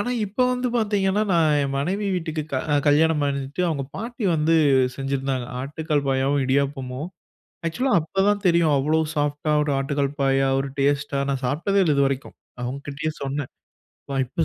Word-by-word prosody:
ஆனா, 245 - -1 0.2
இப்ப 205 +5 -16
வந்து 250 0 -1
பார்த்தீங்கன்னா, 205 -2 +1
நான் 155 -3 +3
என் 140 0 -2
மனைவி 195 +8 -1
வீட்டுக்கு 160 -3 -3
க 130 - +1 0.3
கல்யாணம் 155 +1 +3
பண்ணிட்டு 140 +4 -2
அவுங்க 145 -4 -2
பாட்டி 235 +2 -5
வந்து 155 +2 +2 0.4
செஞ்சிருந்தாங்க. 135 -2 -2 0.2
ஆட்டுக்கால் 145 0 -2
பாயாவும், 135 +1 +1
இடியாப்பமும். 135 +1 -1 0.6
ஆக்சுவலா 255 +10 0
அப்பதான் 195 +5 0
தெரியும். 170 -3 +3
அவ்ளோ 150 +4 +1 0.2
சாஃப்ட்டா 145 +1 -1
ஒரு 150 - -1
ஆட்டுக்கால் 140 0 -1
பாயா, 135 0 +3
ஒரு 135 - -2
டேஸ்ட்டா 140 0 +1
நான் 135 -1 -2
சாப்ட்டதே 170 +10 +1
இல்லை. 155 -5 +2
இதுவரைக்கும். 135 -1 0 0.3
அவுங்க 130 +3 -3
கிட்டயே 150 +3 -3
சொன்னேன். 140 0 -3 0.6
பா - - -2
இப்ப 160 +6 -1
145 Hz, 155 wpm, -23 LUFS, 140-170 Hz, 0.6 s, நான்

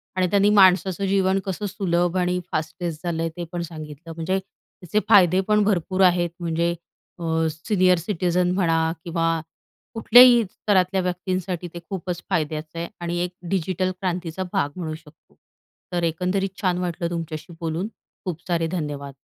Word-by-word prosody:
आणि 185 -1 +2
त्यांनी 200 +1 +4
माणसाचं 190 -1 +4
जीवन 190 0 +2
कसं 190 +1 -3
सुलभ 175 -3 0
आणि 180 0 +1
फास्टेस्ट 160 0 -3
झालं 165 -1 -1
ते 175 - -3
पण 175 -1 -3
सांगितलं 155 -1 -8
म्हणजे, 170 +4 -1
त्याचे 190 0 -5
फायदे 185 -3 +6
पण 210 0 +4
भरपूर 190 -2 0
आहेत 175 -1 +3
म्हणजे. 170 0 0 0.5
अ, - - -6 0.3
सीनियर 180 +3 +2
सिटिझन 180 0 0
म्हणा 165 -3 +2
किंवा, 165 -1 0 0.5
कुठल्याही 240 +1 +7
स्तरातल्या 190 -2 +1
व्यक्तींसाठी 180 0 -2
ते 170 - -6
खूपच 180 -2 -4
फायद्याचं 155 -2 -2
आहे 170 - -3
आणि 175 0 -2
एक 180 - -3 0.2
डिजिटल 185 0 0
क्रांतीचा 180 -1 -3
भाग 145 - +1
म्हणू 160 -4 -4
शकतो. 160 -1 -19 0.6
तर 175 -1 0
एकंदरीत 185 +4 0
छान 180 -2 +1
वाटलं 175 -1 -2
तुमच्याशी 165 0 -5
बोलून. 165 +5 -2 0.4
खूप 175 -3 -4
सारे 165 -2 +1
धन्यवाद. 145 -5 -4
175 Hz, 145 wpm, -23 LUFS, 165-190 Hz, 0.6 s, कुठल्याही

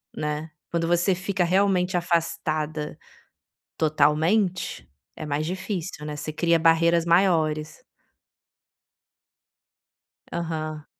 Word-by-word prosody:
né, 150 +1 -3 0.2
quando 165 -1 0
você 175 +3 +2
fica 185 +1 -1
realmente 185 0 +2
afastada 155 -3 -1 0.8
totalmente 160 +6 +1 0.3
é - - -7
mais 150 +1 -1
difícil, 180 -2 -4
né, 150 -1 -5
você 155 +1 -5
cria 170 +1 +2
barreiras 165 +1 +4
maiores. 165 - +1 2.5
Aham. 155 -2 -4
165 Hz, 85 wpm, -25 LUFS, 155-180 Hz, 2.5 s, barreiras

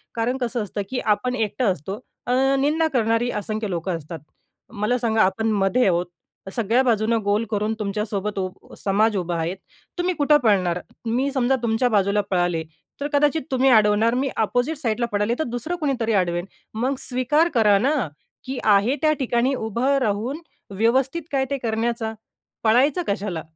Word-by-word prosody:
कारण 235 +3 0
कसं 240 -1 -1
असतं, 205 0 -4
की 255 - -2
आपण 250 +4 0
एकटं 220 -1 0
असतो, 190 - -5 0.3
अ, 245 - 0 0.3
निंदा 310 +3 +2
करणारी 230 0 +1
असंख्य 215 0 -3
लोकं 170 0 -2
असतात. 165 +1 -8 0.5
मला 220 +3 0
सांगा 225 -2 +1
आपण 220 +4 +1
मधे 200 +4 +2
आहोत. 175 0 +2 0.5
सगळ्या 230 +2 +2
बाजूनं 225 -1 +2
गोल 205 +2 +1
करून 210 +1 0
तुमच्यासोबत 210 0 -2
उ 185 0 -6
समाज 210 +2 +1
उभा 175 -1 -2
आहे 165 +2 -1 0.4
तुम्ही 360 +1 0
कुठं 295 -1 +4
पळणार? 185 -5 +2 0.3
मी 250 +5 0
समजा 265 0 +2
तुमच्या 235 +2 +2
बाजूला 205 -1 +2
पळाले 175 -3 +1 0.4
तर 285 - 0
कदाचित 295 +2 +3
तुम्ही 265 +1 +3
अडवणार 215 0 +4
मी 270 +1 0
अपोझिट 245 +8 0
साइडला 235 -4 -1
पळाले 205 +3 +1
तर 315 - +2
दुसरं 245 +8 -3
कोणीतरी 265 -9 -1
अडवेल. 175 -2 +1 0.3
मग 255 +5 -1
स्वीकार 285 +7 +1
करा 210 -4 +5
ना, 275 +7 +2 0.5
की 260 0 -4
आहे 210 +6 +4
त्या 310 -1 +4
ठिकाणी 250 +1 +1
उभं 245 +5 0
राहून 235 +8 -1 0.4
व्यवस्थित 265 - +2
काय 265 -1 +1
ते 280 - 0
करण्याचा. 225 -1 -2 0.5
पळायचं 260 +9 +3
कशाला? 195 -5 -2
225 Hz, 160 wpm, -23 LUFS, 205-255 Hz, 0.5 s, करा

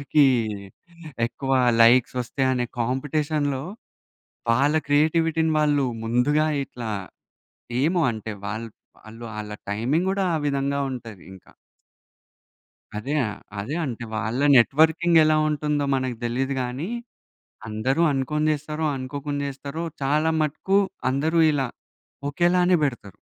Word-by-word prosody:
ఎవరికీ 145 +1 +3 1.0
ఎక్కువ 135 +3 -4 0.3
లైక్స్ 120 +2 +5
ఒస్తయి? 130 +2 -1
అనే 125 -1 0
కాంపిటీషన్‌లో 145 +2 -1 0.9
వాళ్ళ 140 +6 +3
క్రియేటివిటీని 160 +2 +2
వాళ్ళు 145 -2 +2 0.2
ముందుగా 140 +7 +2 0.2
ఇట్లా 120 -4 -7 0.9
ఏమో 170 +3 +2
అంటే 110 -1 -6 0.2
వాళ్ళు 110 +1 -9
ఆళ్ళ 105 0 -6 0.2
టైమింగ్ 140 - 0
కూడా 195 0 0
ఆ - - +1
విధంగా 140 0 0
ఉంటది 115 -7 -8
ఇంక. 95 - -15 1.6
అదే 135 +8 -3
ఆహ్, 105 0 -6 0.2
అదే. 130 +10 -4
అంటే 120 -2 -5
వాళ్ళ 115 +4 -2 0.2
నెట్‌వర్కింగ్ 160 +6 +4
ఎలా 155 0 +3
ఉంటుందో 150 -1 0
మనకు 130 -2 -1
తెలీదు 130 +3 -1
గానీ. 125 +8 -4 0.8
అందరూ 120 +9 0
అనుకోని 145 +3 0
చేస్తారో, 150 +1 -3
అనుకోకుండా 140 +2 -4
చేస్తారో 140 +4 -6 0.2
చాలా 150 +4 +2
మటుకు 155 +6 +1 0.3
అందరూ 155 +5 +1
ఇలా 135 -3 0 0.6
ఒకేలానే 175 +4 +3
పెడతారు. 115 -8 -4
140 Hz, 110 wpm, -24 LUFS, 125-155 Hz, 1.6 s, లైక్స్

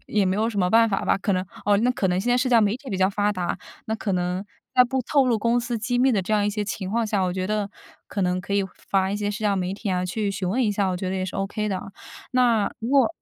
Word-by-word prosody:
也 210 -2 +1
没 185 +1 +1
有 220 +2 +1
什 215 -3 -3
么 180 -1 +2
办 230 +2 +5
法 195 - -1
吧， - - +3
可 200 0 0
能 185 0 0 0.2
哦， 205 0 +4
那 240 +4 +3
可 230 -6 0
能 180 +1 +1
现 240 +5 -1
在 245 - +4
社 255 +1 +1
交 235 -2 +5
媒 210 +1 +2
体 265 +1 -12
比 195 - -1
较 190 +1 +3
发 205 +1 +1
达， 180 -3 -2 0.3
那 220 - -1
可 220 -2 -2
能 180 +1 -1 0.3
在 250 - +7
不 260 +1 -1
透 275 +2 +2
露 240 -2 +3
公 235 +3 +2
司 240 0 -2
机 245 +3 -1
密 260 +1 +4
的 200 -4 +1
这 195 - -3
样 205 -1 +3
一 - - +2
些 210 0 -2
情 195 -1 -4
况 230 +2 +1
下， 205 -2 0
我 180 -1 0
觉 185 0 -2
得 210 0 -1 0.4
可 200 - -3
能 180 0 +1
可 200 +2 -6
以 200 -1 +2 0.2
发 190 -1 +2
一 200 - -1
些 205 0 -2
社 205 - -4
交 200 -1 +2
媒 185 0 -2
体 205 0 -4
啊 180 0 0
去 205 +3 -1
询 195 -2 -3
问 240 +8 +1
一 220 - +2
下， 200 -1 0
我 185 - -1
觉 185 +1 -3
得 190 - -2
也 185 - -1
是 185 - -6
OK 200 +2 -2
的。 190 -2 -2 0.5
那 235 -5 +3
如 225 - -4
果 275 0 +4
205 Hz, 335 characters per minute, -24 LUFS, 190-230 Hz, 0.5 s, 在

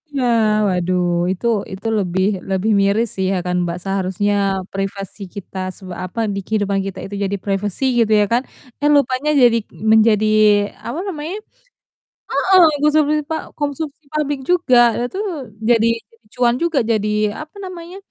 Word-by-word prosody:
Iya, 280 -3 -2 0.4
waduh, 180 -1 0 0.3
itu 190 +5 -5 0.3
itu, 195 +4 -6
lebih 190 -1 0 0.2
lebih 195 +3 0
miris 205 +4 +2
sih 190 - -1
ya 195 - 0
kan, 180 0 -1
Mbak 170 0 -3
seharusnya 195 +1 -1 0.4
privasi 195 +1 -5
kita 195 -1 -9 0.2
s - - -13 0.3
apa, 185 +5 -7 0.2
di - - -2
kehidupan 205 -2 0
kita 195 -1 -6
itu 205 - -7
jadi 200 0 -1
privasi 200 +3 -2 0.2
gitu 220 -1 +1
ya - - +3
kan, 240 - +3 0.4
eh, 295 - +3
lupanya 275 +1 +1
jadi 240 -2 +5 0.3
menjadi, 220 -1 +4 0.6
apa 245 +8 -4
namanya 325 0 -4 1.0
heeh, 375 -1 +4 0.2
konsumsi 300 0 +3
pa 320 - 0 0.2
konsumsi 290 +1 -4
publik 290 -2 -1
juga 345 -9 +4 0.3
itu 375 - -7 0.5
jadi 240 - +6 0.2
jadi 225 0 -26
cuan 245 -1 +2
juga, 335 -4 +1
jadi, 215 -2 +1 0.3
apa 310 +5 -14
namanya, 360 -1 -8
220 Hz, 150 wpm, -19 LUFS, 195-290 Hz, 1.0 s, jadi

